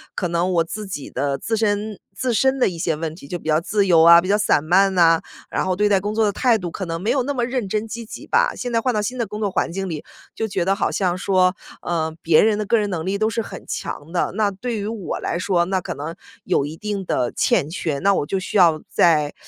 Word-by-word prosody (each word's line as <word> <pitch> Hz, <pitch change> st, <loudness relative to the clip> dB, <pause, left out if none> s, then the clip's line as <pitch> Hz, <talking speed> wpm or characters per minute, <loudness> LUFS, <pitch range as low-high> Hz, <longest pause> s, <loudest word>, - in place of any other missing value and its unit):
可 180 Hz, -, -1 dB
能 170 Hz, +2 st, 0 dB
我 170 Hz, -1 st, +3 dB
自 210 Hz, +5 st, -6 dB
己 145 Hz, -7 st, -6 dB
的 140 Hz, +1 st, -1 dB
自 225 Hz, +8 st, -2 dB
身 210 Hz, -1 st, -1 dB, 0.2 s
自 250 Hz, +5 st, -1 dB
身 265 Hz, +4 st, +2 dB
的 250 Hz, -, +3 dB
一 175 Hz, -, -7 dB
些 165 Hz, -1 st, 0 dB
问 155 Hz, 0 st, -4 dB
题， 165 Hz, -, -13 dB
就 175 Hz, -, -4 dB
比 160 Hz, -, -6 dB
较 155 Hz, 0 st, +4 dB
自 200 Hz, +3 st, 0 dB
由 165 Hz, -3 st, +6 dB
啊， 170 Hz, +1 st, +9 dB
比 185 Hz, -, -5 dB
较 205 Hz, -, +4 dB
散 210 Hz, -8 st, +2 dB
漫 190 Hz, +4 st, +3 dB
呐， 165 Hz, -2 st, +5 dB, 0.3 s
然 -, -, -1 dB
后 185 Hz, -1 st, 0 dB
对 210 Hz, +2 st, +2 dB
待 200 Hz, -2 st, +4 dB
工 205 Hz, +2 st, -3 dB
作 225 Hz, -, +2 dB
的 205 Hz, -, +2 dB
态 235 Hz, +2 st, +2 dB
度 180 Hz, -3 st, -4 dB
可 190 Hz, -, -5 dB
能 165 Hz, 0 st, -4 dB
没 210 Hz, -, -2 dB
有 270 Hz, -, +1 dB
那 285 Hz, +3 st, -2 dB
么 245 Hz, -3 st, -1 dB
认 250 Hz, -4 st, -2 dB
真 215 Hz, +3 st, -1 dB
积 230 Hz, +1 st, -6 dB
极 -, -, -10 dB
吧。 -, -, +2 dB
现 245 Hz, -, -4 dB
在 230 Hz, -, +2 dB
换 255 Hz, +1 st, 0 dB
到 210 Hz, -, 0 dB
新 245 Hz, +5 st, -3 dB
的 235 Hz, -, 0 dB
工 210 Hz, +2 st, -6 dB
作 205 Hz, -, +1 dB
环 -, -, -1 dB
境 195 Hz, +1 st, -4 dB
里， 155 Hz, -3 st, -5 dB, 0.3 s
就 225 Hz, -, -2 dB
觉 195 Hz, -4 st, -1 dB
得 195 Hz, +1 st, +2 dB
好 -, -, 0 dB
像 180 Hz, -2 st, 0 dB
说， 185 Hz, -1 st, +2 dB, 0.3 s
呃， 160 Hz, -2 st, -2 dB
别 165 Hz, -1 st, +5 dB
人 215 Hz, -1 st, +3 dB
的 215 Hz, -, -2 dB
个 230 Hz, -, +3 dB
人 210 Hz, -1 st, 0 dB
能 165 Hz, -3 st, -3 dB
力 195 Hz, +2 st, -1 dB
都 215 Hz, +1 st, +1 dB
是 230 Hz, 0 st, -1 dB
很 -, -, -9 dB
强 145 Hz, +3 st, -5 dB
的， 175 Hz, -, 0 dB
那 210 Hz, -1 st, +1 dB
对 230 Hz, +4 st, -4 dB
于 200 Hz, -, -4 dB
我 215 Hz, -4 st, -4 dB
来 170 Hz, -, -2 dB
说， 180 Hz, -2 st, +1 dB
那 190 Hz, +1 st, -1 dB
可 -, -, -5 dB
能 155 Hz, +4 st, -6 dB, 0.3 s
有 140 Hz, -, +1 dB
一 155 Hz, +2 st, -8 dB
定 205 Hz, -1 st, -3 dB
的 120 Hz, -, 0 dB
欠 140 Hz, -, +1 dB
缺， 160 Hz, -3 st, -2 dB
那 200 Hz, +4 st, +3 dB
我 150 Hz, -, 0 dB
就 195 Hz, -, -1 dB
需 185 Hz, -, -2 dB
要 165 Hz, -4 st, +5 dB
在 150 Hz, -4 st, +3 dB
190 Hz, 300 characters per minute, -21 LUFS, 170-215 Hz, 0.3 s, 啊